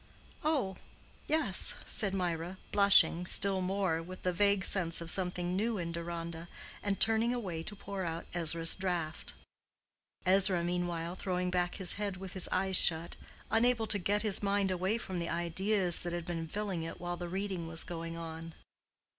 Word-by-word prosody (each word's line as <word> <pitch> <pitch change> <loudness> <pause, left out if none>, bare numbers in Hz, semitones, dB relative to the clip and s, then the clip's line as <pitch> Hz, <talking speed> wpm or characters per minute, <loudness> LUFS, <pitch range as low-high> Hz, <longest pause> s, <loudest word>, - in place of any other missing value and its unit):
"Oh, 265 - -1 0.5
yes," 300 -12 +6
said 195 -3 +2
Mirah, 175 0 -3
blushing 180 -4 +4
still 195 -1 +2
more, 185 -3 -1
with 185 +2 -11
the 180 - 0
vague 200 +1 +2
sense 170 -4 +3
of 170 0 -2
something 180 -1 -1
new 220 +3 -1
in 170 -2 -4
Deronda, 170 0 -6 0.3
and 200 -1 -2
turning 225 +2 +3
away 185 -9 -5
to 205 +5 -5
pour 195 -1 -6
out 165 -1 -5
Ezra's 165 -1 +3
draught; 175 -5 -4 0.9
Ezra 185 -1 +4
meanwhile 175 -1 -3
throwing 180 -1 -3
back 175 -1 -1
his 185 -3 +3
head 200 -2 -3
with 190 -1 -8
his 190 - +3
eyes 190 0 +2
shut, 165 0 +1 0.4
unable 225 +1 +2
to 205 -1 +2
get 205 +3 -1
his 210 -3 +5
mind 200 -1 0
away 185 +4 -1
from 185 -6 -6
the 170 - -4
ideas 175 +2 +2
that 175 0 -4
had 175 -1 -4
been 165 -2 -5
filling 200 -1 -4
it 165 0 -7
while 175 0 -4
the 175 0 -7
reading 190 -2 -4
was 165 0 +1
going 165 -1 -7
on. 165 0 -8
180 Hz, 170 wpm, -31 LUFS, 170-200 Hz, 0.9 s, yes